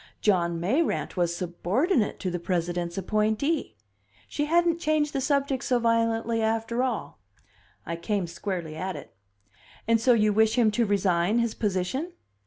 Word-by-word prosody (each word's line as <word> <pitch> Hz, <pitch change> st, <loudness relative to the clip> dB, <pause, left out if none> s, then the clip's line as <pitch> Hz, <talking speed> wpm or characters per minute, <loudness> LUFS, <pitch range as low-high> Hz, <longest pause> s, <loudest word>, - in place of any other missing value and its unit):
John 170 Hz, -5 st, +1 dB
Mayrant 260 Hz, -, 0 dB
was 175 Hz, -2 st, 0 dB
subordinate 205 Hz, -, 0 dB
to 185 Hz, -, -2 dB
the 175 Hz, -, -3 dB
President's 175 Hz, 0 st, -2 dB
appointee! 215 Hz, -, 0 dB, 0.5 s
She 295 Hz, -, -2 dB
hadn't 340 Hz, +1 st, +2 dB
changed 305 Hz, -2 st, +1 dB
the 275 Hz, -, -1 dB
subject 275 Hz, -1 st, 0 dB
so 250 Hz, -, +2 dB
violently, 230 Hz, 0 st, +1 dB
after 225 Hz, +2 st, 0 dB
all. 250 Hz, -, -3 dB, 0.7 s
I 170 Hz, +1 st, -4 dB
came 195 Hz, +2 st, -1 dB
squarely 170 Hz, -2 st, -5 dB
at 185 Hz, +3 st, -4 dB
it. 145 Hz, -, -11 dB, 0.7 s
"And 230 Hz, -1 st, +3 dB
so 245 Hz, +1 st, +5 dB
you 215 Hz, -2 st, +3 dB
wish 220 Hz, +1 st, +3 dB
him 230 Hz, -4 st, +4 dB
to 230 Hz, +1 st, +1 dB
resign 195 Hz, 0 st, +2 dB
his 235 Hz, -2 st, +1 dB
position?" 210 Hz, -, -2 dB
220 Hz, 150 wpm, -26 LUFS, 180-255 Hz, 0.7 s, so